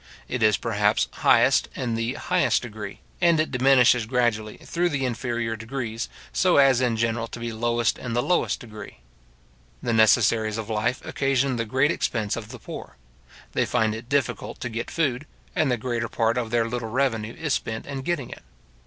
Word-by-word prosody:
It 125 Hz, -, -3 dB
is, 110 Hz, -2 st, +4 dB
perhaps, -, -, +1 dB
highest -, -, +4 dB
in 120 Hz, -3 st, -2 dB
the 115 Hz, +3 st, -1 dB
highest 180 Hz, -6 st, +1 dB
degree, 105 Hz, -4 st, -7 dB, 0.2 s
and 170 Hz, -2 st, +4 dB
it 155 Hz, -, 0 dB
diminishes 125 Hz, -3 st, +4 dB
gradually 115 Hz, -3 st, 0 dB
through 175 Hz, +1 st, -1 dB
the 135 Hz, -4 st, -1 dB
inferior 120 Hz, -2 st, -2 dB
degrees, 115 Hz, 0 st, -4 dB, 0.2 s
so 185 Hz, -4 st, +3 dB
as 135 Hz, -3 st, +5 dB
in 120 Hz, -3 st, +1 dB
general 115 Hz, 0 st, 0 dB
to 120 Hz, -, -8 dB
be 115 Hz, -1 st, -4 dB
lowest 120 Hz, +1 st, 0 dB
in 120 Hz, -, -4 dB
the 120 Hz, +1 st, +1 dB
lowest 180 Hz, -, +1 dB
degree. 110 Hz, -4 st, -10 dB, 0.9 s
The 120 Hz, -, 0 dB
necessaries 110 Hz, 0 st, +4 dB
of 110 Hz, 0 st, -5 dB
life 115 Hz, +4 st, -1 dB
occasion 135 Hz, -2 st, 0 dB
the 115 Hz, -, -1 dB
great 135 Hz, +7 st, +2 dB
expense 110 Hz, -10 st, -1 dB
of 110 Hz, -2 st, -7 dB
the 125 Hz, -, -8 dB
poor. 70 Hz, -, -9 dB, 0.5 s
They -, -, 0 dB
find 110 Hz, -1 st, +1 dB
it 115 Hz, +2 st, -8 dB
difficult 140 Hz, -3 st, -1 dB
to 125 Hz, -, -3 dB
get 115 Hz, +1 st, -4 dB
food, 145 Hz, -3 st, -1 dB, 0.3 s
and 155 Hz, -, +2 dB
the 125 Hz, -, +1 dB
greater 115 Hz, -1 st, -2 dB
part 115 Hz, 0 st, +1 dB
of 120 Hz, -2 st, -2 dB
their 115 Hz, 0 st, +1 dB
little 115 Hz, -1 st, -4 dB
revenue 115 Hz, -3 st, -1 dB
is 150 Hz, -4 st, -2 dB
spent 110 Hz, -3 st, -3 dB
in 140 Hz, -2 st, -5 dB
getting 140 Hz, -3 st, -2 dB
it. -, -, -9 dB
120 Hz, 185 wpm, -25 LUFS, 115-130 Hz, 0.9 s, as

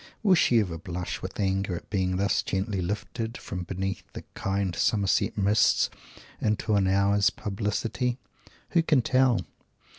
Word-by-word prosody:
Will 195 Hz, -3 st, +5 dB
she 125 Hz, -9 st, +4 dB
ever 90 Hz, -6 st, -2 dB
blush 90 Hz, +1 st, -5 dB
with -, -, -7 dB
anger 95 Hz, -2 st, 0 dB
at -, -, -9 dB
being 95 Hz, -3 st, 0 dB
thus 100 Hz, +1 st, +2 dB
gently 95 Hz, 0 st, -2 dB
lifted 110 Hz, +5 st, -4 dB
up, -, -, -14 dB
from 90 Hz, -2 st, -4 dB
beneath 95 Hz, +1 st, -3 dB
the -, -, -7 dB
kind 95 Hz, -2 st, -1 dB
Somersetshire 95 Hz, +3 st, +2 dB
mists, 100 Hz, +2 st, +3 dB, 0.5 s
into 110 Hz, 0 st, 0 dB
an 100 Hz, -2 st, +3 dB
hour's 100 Hz, +1 st, +3 dB
publicity? 110 Hz, +4 st, -2 dB, 0.5 s
Who 170 Hz, -, +3 dB
can 150 Hz, -6 st, +3 dB
tell? 130 Hz, -1 st, +3 dB
100 Hz, 150 wpm, -27 LUFS, 95-110 Hz, 0.5 s, Will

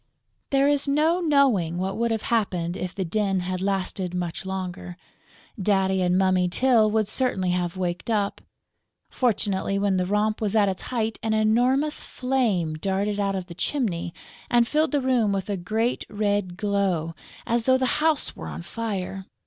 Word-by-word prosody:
There 275 Hz, 0 st, +3 dB
is 285 Hz, 0 st, +2 dB
no 310 Hz, +5 st, +2 dB
knowing 265 Hz, -, +2 dB
what 190 Hz, +2 st, -2 dB
would 235 Hz, +1 st, 0 dB
have 225 Hz, -1 st, -1 dB
happened 180 Hz, -6 st, 0 dB
if 185 Hz, -2 st, -5 dB
the 190 Hz, -, -2 dB
din 195 Hz, +1 st, 0 dB
had 185 Hz, 0 st, -3 dB
lasted 190 Hz, -2 st, -2 dB
much 175 Hz, +1 st, -4 dB
longer. 180 Hz, -2 st, -5 dB, 0.6 s
Daddy 190 Hz, -1 st, +2 dB
and 180 Hz, 0 st, +2 dB
Mummy 185 Hz, -1 st, +2 dB
Tyl 230 Hz, +1 st, +4 dB
would 215 Hz, -1 st, +1 dB
certainly 215 Hz, -6 st, 0 dB
have 175 Hz, 0 st, -1 dB
waked 180 Hz, +3 st, -3 dB
up. 205 Hz, -3 st, 0 dB, 0.7 s
Fortunately, 200 Hz, -5 st, 0 dB
when 200 Hz, -1 st, +1 dB
the 180 Hz, 0 st, 0 dB
romp 210 Hz, +2 st, 0 dB
was 215 Hz, -1 st, 0 dB
at 210 Hz, -2 st, +4 dB
its 190 Hz, -1 st, -2 dB
height, 225 Hz, -3 st, -2 dB
an 220 Hz, -1 st, 0 dB
enormous 250 Hz, +7 st, +2 dB
flame 235 Hz, -11 st, 0 dB
darted 195 Hz, +5 st, -1 dB
out 200 Hz, -1 st, 0 dB
of 185 Hz, -2 st, -3 dB
the 175 Hz, -, -10 dB
chimney 180 Hz, -, -2 dB, 0.4 s
and 240 Hz, -1 st, +4 dB
filled 310 Hz, +3 st, +1 dB
the 290 Hz, -2 st, +1 dB
room 250 Hz, -5 st, +2 dB
with 195 Hz, +1 st, -2 dB
a -, -, 0 dB
great 220 Hz, +7 st, -1 dB
red 205 Hz, -3 st, -1 dB
glow, 195 Hz, -6 st, 0 dB, 0.3 s
as 230 Hz, 0 st, 0 dB
though 260 Hz, 0 st, +5 dB
the 260 Hz, +2 st, 0 dB
house 315 Hz, -2 st, +1 dB
were -, -, -7 dB
on -, -, -6 dB
fire. 195 Hz, -1 st, -4 dB
200 Hz, 175 wpm, -25 LUFS, 185-235 Hz, 0.7 s, though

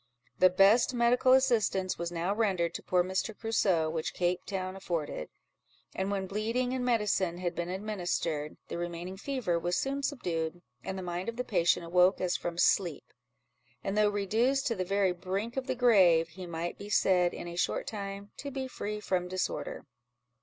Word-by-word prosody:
The 185 Hz, -, +7 dB
best 200 Hz, +7 st, +4 dB
medical 245 Hz, +2 st, +4 dB
assistance 220 Hz, -9 st, +2 dB
was 170 Hz, 0 st, -3 dB
now 175 Hz, +3 st, -1 dB
rendered 190 Hz, -6 st, +1 dB
to -, -, -5 dB
poor 180 Hz, -1 st, +2 dB
Mr. 190 Hz, +4 st, -2 dB
Crusoe 195 Hz, -8 st, +1 dB
which 160 Hz, 0 st, -3 dB
Cape 180 Hz, 0 st, 0 dB
Town 185 Hz, -1 st, -3 dB
afforded; 165 Hz, -, -3 dB, 0.6 s
and 190 Hz, +1 st, -2 dB
when 195 Hz, -1 st, -1 dB
bleeding 230 Hz, +6 st, -1 dB
and 255 Hz, -1 st, -1 dB
medicine 210 Hz, -7 st, +1 dB
had 175 Hz, -1 st, -2 dB
been 170 Hz, 0 st, -3 dB
administered, 175 Hz, -6 st, -2 dB
the -, -, -5 dB
remaining 175 Hz, +2 st, -5 dB
fever 205 Hz, -6 st, -1 dB
was 175 Hz, +1 st, -1 dB
soon 275 Hz, +1 st, -1 dB
subdued, 175 Hz, -, -2 dB, 0.2 s
and 190 Hz, -, -4 dB
the 190 Hz, -, -5 dB
mind 180 Hz, +3 st, -3 dB
of 230 Hz, -, -5 dB
the 250 Hz, -, -2 dB
patient 175 Hz, -5 st, +2 dB
awoke 180 Hz, +3 st, +4 dB
as 180 Hz, -1 st, 0 dB
from 170 Hz, -1 st, -4 dB
sleep; 175 Hz, -2 st, +1 dB, 0.7 s
and 195 Hz, -, -2 dB
though 210 Hz, 0 st, +4 dB
reduced 225 Hz, +7 st, +1 dB
to 230 Hz, -, 0 dB
the 185 Hz, -, -1 dB
very 195 Hz, 0 st, +2 dB
brink 190 Hz, +6 st, -3 dB
of 265 Hz, -1 st, -3 dB
the -, -, -1 dB
grave, 185 Hz, -10 st, +5 dB
he 180 Hz, +2 st, -9 dB
might 170 Hz, +1 st, -4 dB
be 205 Hz, -, -8 dB
said, 180 Hz, -3 st, +3 dB
in -, -, -7 dB
a 170 Hz, -, -6 dB
short 175 Hz, -, 0 dB
time, 200 Hz, -1 st, -6 dB
to 280 Hz, -, -5 dB
be 265 Hz, -1 st, -4 dB
free 210 Hz, -4 st, -4 dB
from 185 Hz, -3 st, -1 dB
disorder. 185 Hz, 0 st, -3 dB
190 Hz, 180 wpm, -30 LUFS, 175-220 Hz, 0.7 s, The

